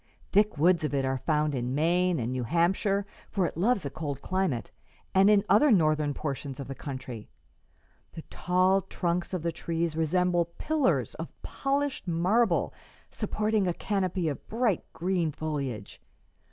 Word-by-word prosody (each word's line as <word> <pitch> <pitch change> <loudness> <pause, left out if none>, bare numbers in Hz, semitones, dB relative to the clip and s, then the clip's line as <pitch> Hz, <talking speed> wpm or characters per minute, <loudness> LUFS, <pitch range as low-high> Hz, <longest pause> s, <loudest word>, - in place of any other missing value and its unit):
Thick 205 -3 +3
woods 170 +2 +4
of 150 -2 -1
it 135 -1 +1
are 130 0 -1
found 150 0 +1
in 125 0 -2
Maine 175 +3 +2
and 120 +1 -2
New 130 0 -2
Hampshire 190 - +1 0.2
for 195 -4 0
it - - -3
loves 200 +1 +1
a 140 - -3
cold 145 -4 -4
climate 185 - -1 0.4
and 195 +2 +6
in 205 -2 +5
other 250 +9 +5
Northern 155 -6 +3
portions 140 -2 -4
of 140 - -6
the 135 - -5
country. 130 -5 -7 0.8
The 160 - -8
tall 185 +2 +2
trunks 175 -1 -2
of 180 -4 -3
the 170 - 0
trees 165 -1 -2
resemble 175 +2 +2
pillars 305 -4 +1
of - - -6
polished 280 -4 -2
marble 185 +8 +2 0.4
supporting 215 -2 0
a 175 - 0
canopy 185 -4 -1
of 145 - -4
bright 225 -5 0
green 175 -2 0
foliage. 140 -9 -4
170 Hz, 155 wpm, -28 LUFS, 150-195 Hz, 0.8 s, and